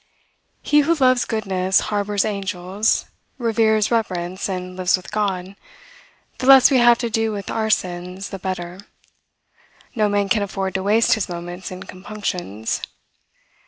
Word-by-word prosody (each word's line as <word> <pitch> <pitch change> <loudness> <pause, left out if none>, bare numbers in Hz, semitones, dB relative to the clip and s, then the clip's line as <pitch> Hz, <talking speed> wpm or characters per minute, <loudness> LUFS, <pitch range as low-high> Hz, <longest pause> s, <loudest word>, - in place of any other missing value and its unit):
He 295 - +4
who 325 +3 +3
loves 255 -4 +3
goodness, 190 -4 +1
harbors 205 0 0
angels, 200 0 -1 0.3
reveres 220 -2 +2
reverence, 185 -5 -1
and 185 -1 -5
lives 185 +1 +2
with 185 - -12
God. 195 -3 -2 0.8
The 255 - -2
less 270 0 +8
we 260 - +5
have 240 0 +6
to 235 -1 -2
do 225 0 0
with 200 -2 -5
our 220 -1 -1
sins, 180 0 -2
the 195 - -7
better. 180 -1 -5 1.1
No 215 -4 +1
man 205 -1 +1
can 200 +2 +2
afford 195 -1 -3
to 190 - -1
waste 215 +4 +3
his 215 -4 -1
moments 175 +1 -6
in 185 0 -8
compunctions. 180 - -4
200 Hz, 145 wpm, -21 LUFS, 185-220 Hz, 1.1 s, less